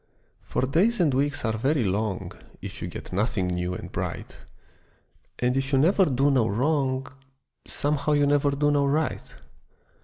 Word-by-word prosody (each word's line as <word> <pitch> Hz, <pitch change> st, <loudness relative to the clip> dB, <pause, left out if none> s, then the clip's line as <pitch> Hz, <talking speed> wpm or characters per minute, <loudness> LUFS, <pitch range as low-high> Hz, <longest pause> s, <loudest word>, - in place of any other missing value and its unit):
For -, -, -2 dB
days 185 Hz, -, +2 dB
and 160 Hz, -6 st, +3 dB
weeks 145 Hz, 0 st, 0 dB
are 110 Hz, -1 st, -1 dB
very 135 Hz, +2 st, +1 dB
long 100 Hz, 0 st, -2 dB, 0.3 s
If -, -, -8 dB
you -, -, -3 dB
get -, -, -8 dB
nothing 100 Hz, 0 st, 0 dB
new 90 Hz, 0 st, -2 dB
and -, -, -8 dB
bright, -, -, -5 dB, 1.0 s
And 125 Hz, +1 st, 0 dB
if 135 Hz, +1 st, -1 dB
you 135 Hz, -, +3 dB
never 185 Hz, +7 st, +4 dB
do 140 Hz, 0 st, +2 dB
no 125 Hz, -5 st, +3 dB
wrong 130 Hz, +3 st, 0 dB, 0.6 s
Somehow 150 Hz, +1 st, 0 dB
you 145 Hz, -1 st, +3 dB
never 145 Hz, 0 st, +3 dB
do 145 Hz, +1 st, +1 dB
no 140 Hz, -1 st, +2 dB
right. 155 Hz, +3 st, -1 dB
140 Hz, 160 wpm, -25 LUFS, 120-145 Hz, 1.0 s, never